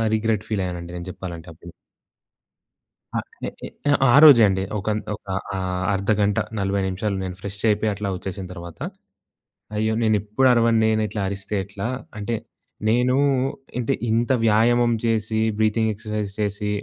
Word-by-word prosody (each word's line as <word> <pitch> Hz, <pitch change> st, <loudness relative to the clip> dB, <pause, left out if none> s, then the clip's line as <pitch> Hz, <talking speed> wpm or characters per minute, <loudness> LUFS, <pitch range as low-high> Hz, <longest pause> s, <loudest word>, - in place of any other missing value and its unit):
Regret 110 Hz, -1 st, 0 dB
ఫీలయ్యానండి. 90 Hz, -5 st, -3 dB
నేను 85 Hz, 0 st, -6 dB
జెప్పాలంటే 85 Hz, -2 st, -7 dB
అప్పుడు. 85 Hz, +1 st, -13 dB, 1.4 s
ఆ! -, -, +2 dB, 0.3 s
ఏ -, -, -2 dB, 0.2 s
ఏ -, -, -6 dB, 0.4 s
ఆ -, -, +4 dB
రోజే 140 Hz, -7 st, +9 dB
అండి. 95 Hz, 0 st, 0 dB, 0.2 s
ఒకన్ 105 Hz, +2 st, -1 dB
ఒక 105 Hz, -, -12 dB, 0.3 s
ఆహ్, 90 Hz, -1 st, -2 dB
అర్ధగంట, 100 Hz, +1 st, +1 dB, 0.2 s
40 100 Hz, 0 st, 0 dB
నిమిషాలు 100 Hz, +2 st, -2 dB
నేను 90 Hz, -1 st, -5 dB
ఫ్రెషయిపోయి 105 Hz, +2 st, 0 dB
అట్లా 100 Hz, 0 st, -4 dB
ఒచ్చేసిన 95 Hz, +1 st, -6 dB
తర్వాత 85 Hz, -2 st, -9 dB, 1.0 s
అయ్యో! 110 Hz, +1 st, +1 dB
నేనెప్పుడరవను 115 Hz, +2 st, +3 dB
నేనిట్లా 110 Hz, -1 st, 0 dB
అరిస్తే 100 Hz, +1 st, -4 dB
ఎట్లా, 100 Hz, +2 st, -5 dB, 0.3 s
అంటే 110 Hz, +3 st, -2 dB, 0.5 s
నేనూ 125 Hz, +3 st, +3 dB, 0.6 s
అంటే 120 Hz, -, 0 dB, 0.2 s
ఇంత 115 Hz, +2 st, +1 dB
వ్యాయామం 120 Hz, +2 st, +4 dB
చేసి, 110 Hz, -1 st, 0 dB, 0.2 s
బ్రీతింగ్ 110 Hz, +1 st, +2 dB
ఎక్సర్‌సై‌జ్ 105 Hz, -1 st, -4 dB
చేసి, 105 Hz, 0 st, -1 dB
105 Hz, 130 wpm, -23 LUFS, 95-110 Hz, 1.4 s, రోజే